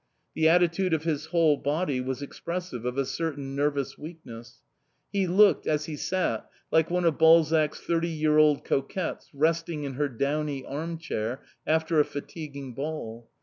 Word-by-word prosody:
The 160 0 +3
attitude 175 +1 +3
of 155 - -4
his 155 -2 -2
whole 160 -3 +3
body 145 -2 -1
was 130 +2 -3
expressive 170 -4 -5
of 125 +1 -2
a 135 - +1
certain 145 -3 -4
nervous 145 -1 -1
weakness; 120 -8 -11 0.5
he 195 -2 +1
looked, 195 +3 +4
as 150 -1 +1
he 155 - -5
sat, 185 +5 -1 0.2
like 160 0 +3
one 180 0 0
of 165 -2 +2
Balzac's 160 -1 +5
thirty 170 0 0
year 155 -1 +2
old 150 -2 +4
coquettes 150 +6 -2
resting 160 +1 0
in 140 -1 -4
her 145 +2 -1
downy 140 +2 -2
arm 165 +4 -4
chair 125 -6 -4 0.2
after 160 0 +2
a - - +7
fatiguing 140 -3 -7
ball. 120 -5 -5
155 Hz, 160 wpm, -27 LUFS, 140-165 Hz, 0.5 s, a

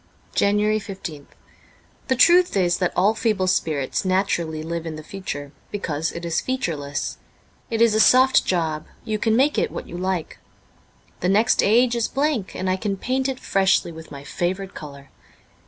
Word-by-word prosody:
'* - - -34
»S - - 0
JANUARY 210 +1 +2
15th 190 -8 -8 0.8
THE 260 - +2
truth 350 - +5
is 175 -2 +2
that 180 -2 +1
all 200 +4 +3
feeble 215 -5 0
spirits 155 -7 0
naturally 175 -4 0
live 165 0 -4
in 160 - -5
the 155 - -8
future, 145 -6 -6 0.2
because 160 -6 -2
it 170 0 -7
is 165 -1 0
featureless; 160 - -3 0.5
it 225 0 +2
is 230 -2 +4
a 215 - +2
soft 260 +3 +6
job; 160 -4 -1 0.2
you 215 -1 -2
can 220 0 +2
make 275 +5 +3
it - - 0
what - - -7
you - - -8
like. 185 -2 -3 0.8
The 180 - 0
next 215 +3 +4
age 240 +3 +3
is 235 -1 0
blank, 275 -8 -1
and 185 - -3
I 185 0 +1
can 200 0 -2
paint 260 +5 -1
it 260 -1 -4
freshly 190 -3 +2
with 160 0 -11
my 140 -1 -9
favourite 185 +5 -3
colour. 140 -2 -10
190 Hz, 180 wpm, -23 LUFS, 165-220 Hz, 0.8 s, soft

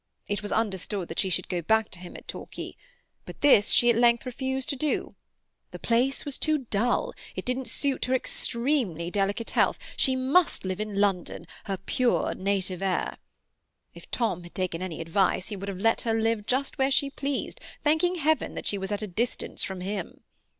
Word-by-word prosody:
It 205 -1 -1
was 205 - -4
understood 200 -3 -1
that 165 - -3
she 190 - +2
should 180 0 +1
go 180 -2 -1
back 220 +5 +2
to 175 - -8
him 180 -1 -9
at - - -14
Torquay, - - -7 0.5
but - - -11
this 245 -8 +6
she 240 - +6
at - - +1
length 235 +1 +4
refused 265 +1 -2
to - - +1
do. 295 +3 -1 0.6
The - - -8
place 245 +4 +1
was 285 -2 -3
too 305 -4 +1
dull; 230 +4 +1 0.2
it - - -4
didn't 250 +1 -1
suit 280 -2 -1
her 255 - +2
extremely 235 - 0
delicate 205 +3 0
health; - - +3 0.2
she 260 - +2
must 270 - +2
live 185 0 -2
in 210 -2 -2
London, 195 -4 0 0.2
her 195 -2 -2
pure 250 +5 +1
native 190 -1 -1
air. 190 -2 0 0.8
If - - -13
Tom 225 -8 0
had 175 0 -13
taken 180 -2 -2
any 180 -3 -4
advice, 185 +3 +1
he 210 - -4
would 200 +1 -5
have 195 - -4
let 225 +4 +2
her 225 -1 +1
live 225 -2 0
just 270 +2 -1
where 265 0 +4
she 275 +1 +2
pleased, 280 0 -3 0.2
thanking 320 +4 +3
Heaven 315 -1 +1
that - - -5
she 200 - 0
was 195 +1 -4
at 205 +1 -1
a - - -3
distance 225 +6 -2
from 190 -1 -3
him. 195 -1 -4
220 Hz, 195 wpm, -27 LUFS, 190-260 Hz, 0.8 s, this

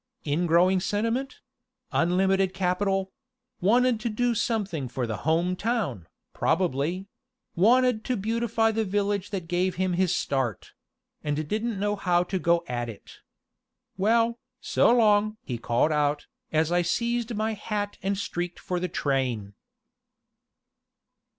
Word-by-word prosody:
"Ingrowing 175 +4 +3
sentiment 230 +7 -2 0.5
unlimited 190 +2 +2
capital 195 +1 0 0.5
wanted 240 +4 +3
to 235 +1 -2
do 240 +2 +1
something 200 - -1
for 125 0 -3
the 110 -2 -3
Home 175 +3 +2
Town, 190 - -2 0.3
probably; 170 +2 0 0.5
wanted 240 +4 +4
to 255 -2 0
beautify 225 +1 +1
the 220 0 0
village 205 -1 -1
that 185 -5 -4
gave 180 +1 0
him 185 0 0
his 180 0 +2
start 135 - -2 0.5
and 150 0 -2
didn't 215 +2 -2
know 205 +1 0
how 180 -3 +2
to 185 +1 -3
go 170 0 +2
at 120 -1 -3
it. 110 - -11 0.8
Well, 230 +4 +2 0.2
so - - +3
long!" 215 -2 +3
he 120 -3 -4
called 120 +6 +1
out, 150 -1 +1 0.3
as 160 +1 +1
I 175 0 +3
seized 235 +6 -1
my 220 +1 -1
hat 205 -1 -4
and 195 +1 -1
streaked 175 -2 -3
for 180 -1 -3
the 180 0 -2
train. 130 - -1
190 Hz, 130 wpm, -26 LUFS, 165-215 Hz, 0.8 s, wanted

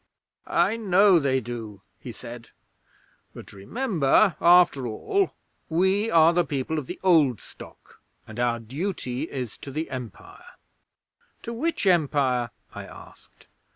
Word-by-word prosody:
'"I 225 - +1
know 195 -3 +4
they 135 -3 +1
do," 110 -4 -8 0.2
he 125 - -8
said; 120 0 -11 0.9
"but - - -11
remember, 180 - +1
after 170 -7 +5
all, 385 - -1 0.3
we 190 +6 +1
are 165 -3 +5
the 175 0 +2
people 145 +1 -3
of 135 - -8
the - - -7
Old 155 - +4
Stock, - - -15 0.2
and 110 +2 -10
our 120 -1 +1
duty 135 - -4
is 125 -5 -6
to - - -10
the 155 +3 -5
Empire." 125 -4 -10 0.9
'"To 235 - -5
which 310 +2 -2
Empire?" 140 -8 +2 0.2
I - - -8
asked. - - -16
145 Hz, 130 wpm, -25 LUFS, 120-180 Hz, 0.9 s, after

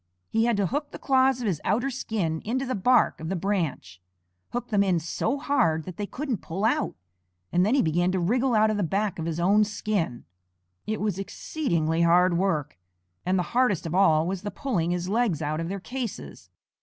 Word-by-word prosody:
He 225 +1 +2
had 235 -3 +2
to 200 - +2
hook 290 - -2
the - - -8
claws 265 -1 +2
of - - -3
his 180 -8 -1
outer 250 +6 +1
skin 200 -11 -2
into 260 +5 -1
the 255 - -2
bark 245 +5 +3
of 160 +1 -5
the 190 - -1
branch, 165 - -2 0.5
hook 245 0 -4
them 205 -2 +3
in 190 -3 +2
so 170 - -2
hard 245 - +1
that 180 0 -9
they 205 - -3
couldn't 260 - -3
pull 190 +6 -3
out, 225 - +1 0.6
and 180 - +3
then 215 +7 +3
he 275 - +3
began 175 +3 +1
to 190 - +1
wriggle 240 +7 +1
out 215 0 +4
of 215 - -1
the 205 - 0
back 195 +2 -1
of 160 - -3
his 165 0 -2
own 200 +5 +4
skin. 205 - -2 0.6
It 215 -1 -2
was 205 -3 -1
exceedingly 170 - -1
hard 175 +1 +4
work, 165 - -1 0.5
and 185 +1 +2
the 180 - +1
hardest 240 -9 +2
of 165 - -3
all 160 -4 +4
was 185 +1 -3
the 205 - -4
pulling 205 - -1
his 175 0 -1
legs 210 -5 +1
out 155 0 -2
of 165 +1 -3
their 195 +1 -3
cases. 220 - -6
195 Hz, 210 wpm, -26 LUFS, 170-235 Hz, 0.6 s, out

